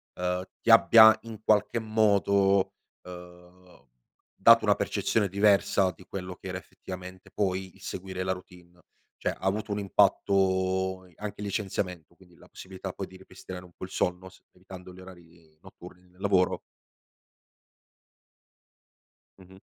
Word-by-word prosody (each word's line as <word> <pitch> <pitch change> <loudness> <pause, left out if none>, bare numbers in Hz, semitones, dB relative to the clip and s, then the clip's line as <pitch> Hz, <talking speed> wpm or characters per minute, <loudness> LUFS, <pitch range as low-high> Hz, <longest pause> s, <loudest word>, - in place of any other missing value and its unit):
ehm, 90 0 -2 0.2
ti 115 - +3
abbia 110 -1 +8
in 115 -2 -9
qualche 105 +1 +2
modo, 100 -3 +2 0.3
uhm, 90 0 -14 0.5
dato - - +6
una - - +3
percezione 105 -2 0
diversa 100 -1 +2
di 90 - -17
quello 90 -1 -7
che - - -11
era 90 - -4
effettivamente 95 0 -11
poi 95 -2 -2
il - - -20
seguire 95 0 -6
la 95 - -1
routine. 90 -1 -10 0.4
Cioè - - -2
ha - - -10
avuto 105 +3 -2
un 100 - -1
impatto 95 -2 +1
i 90 - -23
anche 105 -1 -7
licenziamento 95 -5 -4
quindi 90 -2 -21
la - - -19
possibilità 95 0 -8
poi 95 - -6
di 95 - -14
ripristinare 95 -1 -11
un 90 - -18
po' - - -8
il - - -13
sonno 90 +1 -2
semplificando 90 0 -14
gli 95 - -14
orari 85 -4 -17
notturni 90 -1 -15
nel 90 +1 -22
lavoro? 95 -2 +2 2.8
Mh-mh. 95 0 -16
95 Hz, 140 wpm, -27 LUFS, 90-100 Hz, 2.8 s, abbia